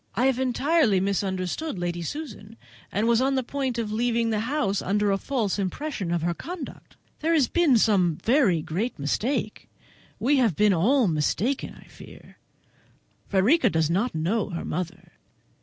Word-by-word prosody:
I 250 Hz, -, +2 dB
have 265 Hz, -2 st, +2 dB
entirely 260 Hz, -, +2 dB
misunderstood 195 Hz, -, -2 dB
Lady 175 Hz, -1 st, -3 dB
Susan, 230 Hz, -, -7 dB, 0.3 s
and 210 Hz, +3 st, 0 dB
was 235 Hz, 0 st, +3 dB
on 270 Hz, +1 st, +1 dB
the 260 Hz, -, 0 dB
point 265 Hz, -1 st, -3 dB
of 225 Hz, -3 st, -2 dB
leaving 230 Hz, +1 st, 0 dB
the 215 Hz, -, 0 dB
house 230 Hz, -4 st, -1 dB
under 205 Hz, +1 st, +1 dB
a 195 Hz, -, +2 dB
false 225 Hz, -7 st, -1 dB
impression 200 Hz, -, -3 dB
of 170 Hz, -2 st, -1 dB
her 170 Hz, 0 st, 0 dB
conduct. 330 Hz, -, -9 dB, 0.2 s
There 330 Hz, +2 st, +1 dB
has 285 Hz, -6 st, +3 dB
been 325 Hz, -8 st, +3 dB
some 190 Hz, -7 st, +3 dB
very 220 Hz, -, +2 dB
great 200 Hz, +12 st, -3 dB
mistake; 215 Hz, -, -2 dB, 0.5 s
we 280 Hz, +4 st, +2 dB
have 230 Hz, -, +2 dB
been 210 Hz, +2 st, +4 dB
all 230 Hz, +8 st, +3 dB
mistaken, 190 Hz, -, -1 dB
I -, -, -15 dB
fancy. -, -, -15 dB, 0.9 s
Frederica 230 Hz, -, +3 dB
does 160 Hz, -2 st, +1 dB
not 205 Hz, +6 st, 0 dB
know 190 Hz, +8 st, 0 dB
her 170 Hz, -3 st, -5 dB
mother. 180 Hz, +2 st, -5 dB
220 Hz, 160 wpm, -25 LUFS, 185-265 Hz, 0.9 s, been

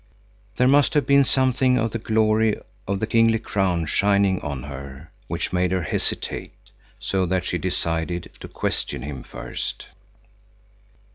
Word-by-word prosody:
There 125 Hz, -, +4 dB
must 145 Hz, +3 st, +4 dB
have 145 Hz, -3 st, +3 dB
been 140 Hz, 0 st, +6 dB
something 130 Hz, -1 st, +2 dB
of 115 Hz, -2 st, 0 dB
the 115 Hz, -, -3 dB
glory 110 Hz, 0 st, +2 dB, 0.3 s
of 100 Hz, 0 st, -1 dB
the 110 Hz, -, 0 dB
kingly 115 Hz, 0 st, +4 dB
crown 95 Hz, -6 st, 0 dB
shining 100 Hz, +3 st, +2 dB
on 70 Hz, -5 st, -4 dB
her, 70 Hz, +2 st, -9 dB, 0.2 s
which -, -, -3 dB
made 90 Hz, 0 st, +2 dB
her 95 Hz, -2 st, 0 dB
hesitate -, -, -3 dB, 0.4 s
so 95 Hz, -1 st, -1 dB
that 95 Hz, 0 st, 0 dB
she -, -, -1 dB
decided 85 Hz, +1 st, -2 dB
to -, -, -8 dB
question -, -, -3 dB
him 70 Hz, -2 st, -6 dB
first. -, -, -6 dB
100 Hz, 145 wpm, -23 LUFS, 85-115 Hz, 0.4 s, been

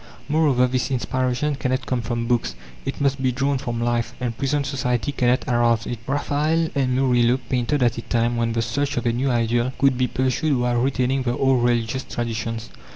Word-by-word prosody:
Moreover, 145 Hz, -4 st, +3 dB
this 125 Hz, 0 st, -1 dB
inspiration 130 Hz, +2 st, 0 dB
cannot 130 Hz, -1 st, -2 dB
come 125 Hz, -2 st, -1 dB
from 115 Hz, +1 st, -2 dB
books; 120 Hz, -, 0 dB, 0.3 s
it -, -, -4 dB
must 140 Hz, -1 st, +1 dB
be 130 Hz, -1 st, +2 dB
drawn 135 Hz, +2 st, 0 dB
from 120 Hz, -3 st, -3 dB
life, 120 Hz, 0 st, -1 dB
and 120 Hz, -2 st, -2 dB
present 140 Hz, +2 st, 0 dB
society 125 Hz, -1 st, -1 dB
cannot 125 Hz, -2 st, +1 dB
arouse 120 Hz, -2 st, +2 dB
it. 120 Hz, -, -4 dB
Raphael 150 Hz, +4 st, 0 dB
and 130 Hz, -3 st, +1 dB
Murillo 125 Hz, -2 st, +3 dB
painted 130 Hz, +2 st, -1 dB
at 120 Hz, -1 st, +1 dB
a -, -, -4 dB
time 120 Hz, +1 st, 0 dB
when 115 Hz, -1 st, 0 dB
the 115 Hz, 0 st, 0 dB
search 140 Hz, +5 st, -2 dB
of 120 Hz, -, -1 dB
a 120 Hz, -, +2 dB
new 130 Hz, +3 st, 0 dB
ideal 120 Hz, +1 st, +1 dB
could 135 Hz, -2 st, +2 dB
be 125 Hz, -, +2 dB
pursued 130 Hz, +4 st, 0 dB
while 120 Hz, -1 st, +1 dB
retaining 130 Hz, 0 st, +1 dB
the 120 Hz, -1 st, -1 dB
old 130 Hz, -2 st, +3 dB
religious 120 Hz, +1 st, 0 dB
traditions. 115 Hz, -1 st, -4 dB
125 Hz, 195 wpm, -22 LUFS, 120-135 Hz, 0.3 s, Moreover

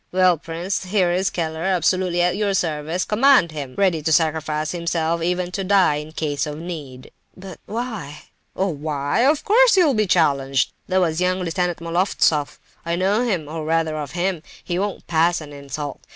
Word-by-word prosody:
Well, 185 Hz, -1 st, +4 dB
prince, 170 Hz, +5 st, -4 dB
here 185 Hz, -2 st, +1 dB
is 185 Hz, +2 st, +1 dB
Keller, 160 Hz, -2 st, -3 dB
absolutely 180 Hz, 0 st, +1 dB
at 180 Hz, 0 st, +1 dB
your 200 Hz, -1 st, 0 dB
service—command 180 Hz, -, +2 dB
him!—ready 155 Hz, +4 st, -1 dB
to 160 Hz, +2 st, -1 dB
sacrifice 155 Hz, -1 st, +1 dB
himself—even 170 Hz, +1 st, -1 dB
to 195 Hz, +2 st, -3 dB
die 185 Hz, -6 st, +3 dB
in 150 Hz, +1 st, -7 dB
case 150 Hz, -2 st, -2 dB
of 150 Hz, 0 st, -5 dB
need." 150 Hz, -6 st, -8 dB, 0.3 s
"But—why?" 195 Hz, -, -7 dB, 0.3 s
"Oh, 195 Hz, +1 st, 0 dB
why?—Of 155 Hz, -, 0 dB
course 460 Hz, +1 st, +5 dB
you'll 330 Hz, -7 st, +5 dB
be 215 Hz, -3 st, +1 dB
challenged! 140 Hz, -6 st, +2 dB, 0.2 s
That 185 Hz, 0 st, +2 dB
was 165 Hz, -1 st, 0 dB
young 185 Hz, +1 st, +1 dB
Lieutenant 175 Hz, 0 st, -1 dB
Moloftsoff. 165 Hz, -3 st, +1 dB, 0.3 s
I 170 Hz, 0 st, -1 dB
know 195 Hz, +5 st, +1 dB
him, 190 Hz, -11 st, -1 dB
or 160 Hz, +1 st, -5 dB
rather 160 Hz, 0 st, 0 dB
of 150 Hz, -2 st, -5 dB
him; 175 Hz, -1 st, -1 dB, 0.2 s
he 175 Hz, 0 st, -2 dB
won't 200 Hz, 0 st, -3 dB
pass 170 Hz, +1 st, +2 dB
an 150 Hz, -2 st, -10 dB
insult. 140 Hz, 0 st, -6 dB
170 Hz, 160 wpm, -21 LUFS, 155-185 Hz, 0.3 s, course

